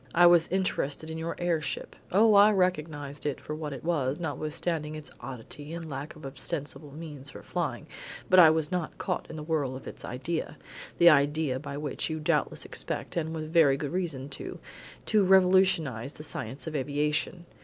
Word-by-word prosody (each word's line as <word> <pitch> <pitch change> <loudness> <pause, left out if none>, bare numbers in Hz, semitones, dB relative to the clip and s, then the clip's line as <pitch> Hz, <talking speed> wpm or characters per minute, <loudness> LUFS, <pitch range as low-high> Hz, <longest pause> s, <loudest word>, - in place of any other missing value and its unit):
I 175 +1 +7
was 175 -1 +6
interested 160 -4 -1
in 160 - -5
your 165 +1 -3
air 175 -3 0
ship - - -4 0.2
Oh, 215 +3 +5
I 205 +1 +8
recognised 155 -6 -1
it 145 -2 -2
for 150 - -6
what 155 -1 -4
it 135 - -7
was, 150 -4 0
notwithstanding 155 0 -2
its 155 -1 -9
oddity 135 +5 -7
and 170 -1 -6
lack 140 +1 -6
of 155 - -11
ostensible 145 +2 -4
means 145 -2 -7
for - - -11
flying - - -3 0.4
but 185 - +6
I 165 -3 +10
was 160 +1 +1
not 180 -3 -2
caught 180 -3 -3
in 160 - -7
the 155 - -6
whirl 150 -5 -1
of 130 - -9
its - - -9
idea; 140 +7 -3 0.4
the 170 - +8
idea 145 -2 +2
by 140 0 -6
which 150 +1 -3
you 160 0 -3
doubtless 150 - 0
expect, - - -3
and 160 -2 -1
with 160 0 -5
very 150 -5 +5
good 140 0 -4
reason 160 -7 -2
too, 140 - -7 0.5
to 215 -2 +3
revolutionise 185 -9 +4
the 150 - -10
science 135 -4 -5
of 160 - -5
aviation. 150 +5 -1
155 Hz, 185 wpm, -28 LUFS, 145-170 Hz, 0.5 s, I